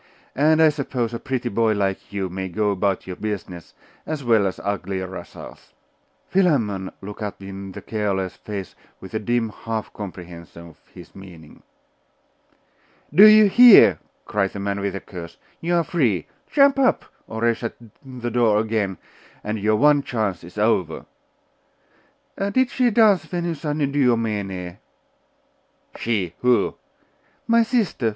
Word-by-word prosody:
And 155 +3 +4
I 160 - +7
suppose 130 -5 -3
a 115 - -4
pretty 130 -3 -3
boy 110 +1 +1
like 100 -2 -2
you 100 -2 -2
may 95 +1 -5
go 105 +3 0
about 100 -1 -1
your 95 - -6
business, 95 -4 -6 0.3
as 155 -3 -5
well 110 -5 +3
as 95 - -5
uglier 95 -1 -3
rascals!' 95 -8 -11 0.5
Philammon 115 - +1
looked 105 +2 -8
up 105 -1 -5
in 95 0 -8
the - - -8
gaoler's 95 -4 -2
face 100 -2 -7 0.3
with 95 - -12
a 110 - -1
dim 120 +1 -1
half 110 0 -5
comprehension 85 -3 -10
of 80 - -20
his - - -14
meaning. 90 -5 -14 1.5
'Do 200 +7 +9
you 215 0 +8
hear?' 240 +2 +8 0.3
cried 100 -2 -1
the 100 - -6
man 100 0 -2
with 100 -1 -3
a - - -3
curse. 85 -4 -10 0.2
'You 175 +1 -1
are 170 - +2
free. 120 - 0 0.2
Jump 275 -1 +4
up, 260 -2 +2 0.2
or 110 +1 -3
I 120 - +4
shut 115 0 -6 0.3
the 125 -3 -6
door 115 -3 +3
again, 110 -3 -1 0.5
and 105 +1 -3
your 110 +1 +2
one 145 +4 +4
chance 110 -10 -3
is 85 +4 -13
over.' 105 -6 0 1.3
'Did 245 +6 +1
she 250 -2 +2
dance 210 -4 +4
Venus 170 -4 -4
Anadyomene?' 115 - -1 1.2
'She! 100 -7 -2
Who?' 125 -1 +2 0.7
'My 230 0 +4
sister! 225 - 0
110 Hz, 145 wpm, -22 LUFS, 95-145 Hz, 1.5 s, Do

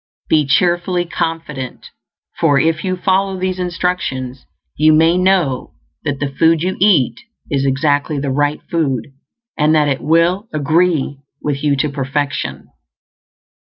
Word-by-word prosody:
Be 150 -3 +2
cheerfully 175 +3 +1
confident, 160 -6 -4 0.5
for 145 -4 +3
if 160 +3 +1
you 185 -1 -1
follow 190 +1 +1
these 185 0 -2
instructions 170 -8 -3 0.3
you 155 +1 +4
may 165 +2 +4
KNOW 180 -8 +1 0.3
that 145 -2 -2
the 145 -1 -2
food 165 0 +4
you 185 +1 -1
eat 145 - +3 0.3
is 140 -1 +1
exactly 145 +2 +1
the 140 -1 -2
right 145 +2 0
food, 145 -7 -2 0.5
and 155 +1 +3
that 150 -1 +3
it 135 -2 -1
will 170 +7 +2
"agree" 155 -1 +1 0.2
with 145 -1 -2
you 145 -2 +2
to 145 +2 0
perfection. 140 +1 -3
155 Hz, 135 wpm, -17 LUFS, 140-175 Hz, 0.5 s, you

